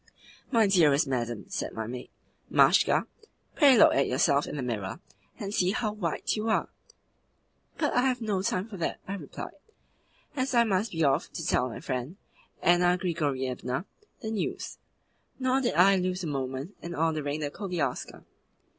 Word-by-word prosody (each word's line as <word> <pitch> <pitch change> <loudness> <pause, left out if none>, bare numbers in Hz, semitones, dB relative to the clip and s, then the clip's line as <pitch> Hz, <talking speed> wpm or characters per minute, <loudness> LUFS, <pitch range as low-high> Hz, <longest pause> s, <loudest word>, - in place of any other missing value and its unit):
'My 230 -4 +4
dearest 155 -8 +4
madam,' 120 -4 -2
said - - -3
my 110 - -3
maid, 125 +2 -7 0.4
Mashka, - - +4 0.5
'pray 280 -5 +6
look 210 - +7
at 140 - +2
yourself 140 +2 +2
in - - -5
the 140 - -3
mirror, 105 -6 -3 0.4
and 200 0 -4
see 185 -4 +2
how 220 -1 -1
white 175 -7 -2
you 220 +1 -2
are.' 220 - +1 1.1
'But 300 - 0
I 245 - +3
have 255 -1 0
no 210 -5 -1
time 185 +1 -1
for 210 -4 -8
that,' 170 - -2
I 195 - -3
replied, 200 - -7 0.8
'as 260 -1 -1
I 235 - +6
must 205 0 0
be 165 -1 0
off 140 +2 +1
to 165 - -5
tell 125 -4 +1
my 115 - -8
friend, 130 +8 -4 0.5
Anna 175 +1 +4
Grigorievna, 140 -5 -2 0.4
the 220 -3 -4
news.' 215 -4 -3 0.6
Nor 260 0 +1
did 245 - 0
I 195 +3 +6
lose 185 0 -1
a - - -2
moment 135 +4 -4
in 170 0 -6
ordering 155 -2 -1
the 145 -1 -2
koliaska. 175 -10 -3
175 Hz, 165 wpm, -28 LUFS, 140-210 Hz, 1.1 s, look